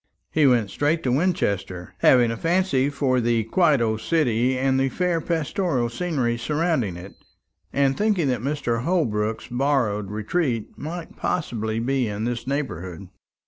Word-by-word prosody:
He 155 -3 +4
went 115 -6 +2
straight 150 +7 0
to 125 - +1
Winchester, 100 - -1
having 120 -3 +5
a - - -2
fancy 165 -2 +1
for 135 -3 +1
the 115 -1 +1
quiet 150 - +3
old 110 -1 0
city 130 -4 +1
and 135 0 +1
the 135 0 +2
fair 175 +3 0
pastoral 160 - -1
scenery 125 -5 -1
surrounding 150 - 0
it, 90 +3 -10 0.6
and 135 -1 +2
thinking 205 -7 +1
that 125 -3 -1
Mr. 130 -4 -1
Holbrook's 115 - 0
borrowed 120 -6 0
retreat 115 +3 -2
might 165 +2 -7
possibly 110 -10 -2
be 125 +1 0
in 105 +1 -4
this 120 +1 -3
neighbourhood. 95 - -4
130 Hz, 145 wpm, -23 LUFS, 115-155 Hz, 0.6 s, having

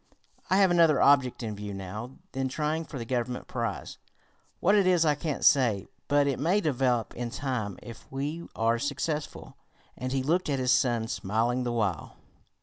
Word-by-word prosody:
"I 190 - +4
have 195 -2 +5
another 165 -5 +5
object 140 -4 +4
in 110 -2 -4
view 100 0 -6
now 105 +7 -7
than 135 0 -1
trying 155 +3 -2
for 140 - -8
the 115 - -5
Government 125 0 -2
prize. 115 -4 -4 0.6
What 195 - +3
it 200 -3 +4
is 175 -3 +4
I 150 - +4
can't 145 0 -3
say, 120 -8 +4 0.2
but 145 0 +3
it 140 -2 -1
may 175 +8 +2
develop 130 - 0
in 120 0 -4
time 115 -6 -3
if 115 -2 -12
we 145 +5 -4
are 115 +1 +1
successful," 145 +2 -4 0.4
and 130 0 -4
he 135 -1 0
looked 170 +4 +1
at 140 - +1
his 130 -1 +1
son, 120 -3 +2
smiling 115 +5 -1
the 120 - -1
while. 105 -9 -2
130 Hz, 180 wpm, -28 LUFS, 115-150 Hz, 0.6 s, have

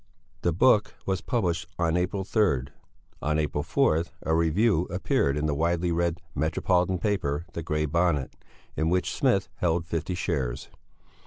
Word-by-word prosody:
The 85 - +2
book 105 +5 +3
was 95 -1 -1
published 85 -9 -1
on 85 -1 +1
April 90 +2 0
3. 95 - +2 0.6
On 75 +1 0
April 75 -1 0
4, 80 +2 +2 0.2
a 80 - 0
review 85 +3 +2
appeared 80 -5 +1
in 75 - -1
the 75 - +1
widely 85 +3 0
read 85 0 0
metropolitan 90 +5 +1
paper 85 -6 -1
the 85 - -4
Grey 75 -1 -1
Bonnet, 80 -3 +1 0.4
in 80 +1 +1
which 90 +1 0
Smith - - +2
held 85 -1 0
fifty 80 +2 -3
shares. 70 -9 -2
85 Hz, 150 wpm, -27 LUFS, 75-90 Hz, 0.6 s, book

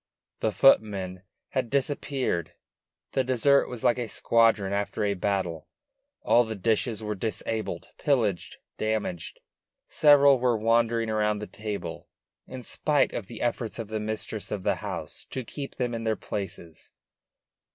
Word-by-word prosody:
The 110 - +1
footmen 100 -7 +3 0.3
had 130 -3 -1
disappeared. 135 - -1 0.6
The 130 - +1
dessert 130 +2 +3
was 125 -3 -7
like 120 - +3
a 120 - -2
squadron 110 -4 +3
after 100 +1 -1
a 100 -1 +2
battle: 90 -4 -2 0.6
all 120 - +5
the 110 -1 -5
dishes 110 +2 0
were 105 0 -2
disabled, 110 +1 -3
pillaged, 110 - 0 0.2
damaged; 105 -6 -2 0.4
several 140 -3 +6
were 120 -2 +2
wandering 115 0 +2
around 105 -1 +1
the 105 - -5
table, 100 -6 -6 0.4
in 130 -1 -8
spite 145 +4 +1
of 95 - -4
the 115 - -6
efforts 120 -1 -2
of 115 -3 -5
the 110 0 -2
mistress 110 0 -3
of 100 -3 -4
the - - +1
house - - -6
to 130 - -4
keep 140 +4 -7
them 125 -2 -1
in 115 0 -3
their 110 -1 +1
places. 85 -7 -6
110 Hz, 145 wpm, -27 LUFS, 100-120 Hz, 0.6 s, several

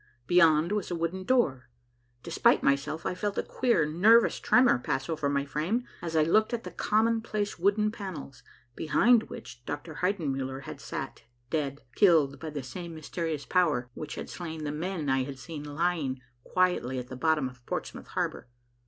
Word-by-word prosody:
Beyond 165 +1 +5
was 210 -2 -1
a 175 - -2
wooden 170 +3 -3
door. 150 - +1 0.5
Despite - - +3
myself, 140 +4 +1
I - - 0
felt 205 +2 -3
a - - +1
queer, 235 -11 +1
nervous 210 +10 +5
tremor 245 - +4
pass 135 +2 -2
over 155 -3 -1
my 140 0 0
frame, 165 - -1 0.2
as 165 -1 -4
I 155 - +5
looked 215 +9 +3
at 230 - -7
the - - -7
commonplace 215 -2 0
wooden 210 +3 +2
panels, 165 - -7 0.3
behind 225 +8 +3
which 120 +1 -10
Dr. 145 +4 -6
Heidenmuller 135 -8 -1
had - - -8
sat - - -6 0.3
dead, 145 -3 -1
killed 155 -6 +4
by 160 - -5
the 145 -3 -5
same 170 +5 -7
mysterious 155 -1 -4
power 150 -9 +1
which 150 +2 -6
had - - -6
slain 160 -3 -6
the 145 - -2
men 160 0 -3
I 135 0 +2
had 135 0 -7
seen 150 +1 -7
lying 150 -3 -1 0.2
quietly 180 -9 +1
at 125 0 -5
the 130 - -6
bottom 155 0 +1
of 125 -1 -13
Portsmouth - - -5
Harbor. - - -3
160 Hz, 170 wpm, -29 LUFS, 140-185 Hz, 0.5 s, Beyond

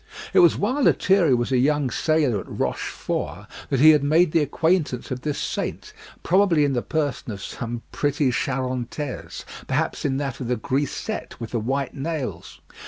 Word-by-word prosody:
It - - +6
was 350 - +6
while 255 +8 0
Lethierry 185 - +4
was 120 +2 -1
a 130 - +3
young 145 -1 +2
sailor 150 -9 +1
at - - -9
Rochefort 85 +8 -3 0.2
that 135 - +1
he 155 +1 +9
had 150 -2 +4
made 160 +3 +4
the 165 - +3
acquaintance 155 -3 0
of 125 0 -3
this 150 0 -2
saint, - - -4 0.3
probably 175 -5 +4
in 140 - 0
the 120 - 0
person 145 -6 -2
of 100 - -6
some 120 0 -5
pretty 145 -2 +1
Charantaise, 130 +2 -3 0.2
perhaps - - -1
in 135 -2 0
that 135 -2 -3
of 125 - -4
the 125 - +1
grisette 140 - -3
with 115 -2 -6
the 120 - 0
white 135 +5 -2
nails. 135 - -5
140 Hz, 170 wpm, -23 LUFS, 125-155 Hz, 0.3 s, he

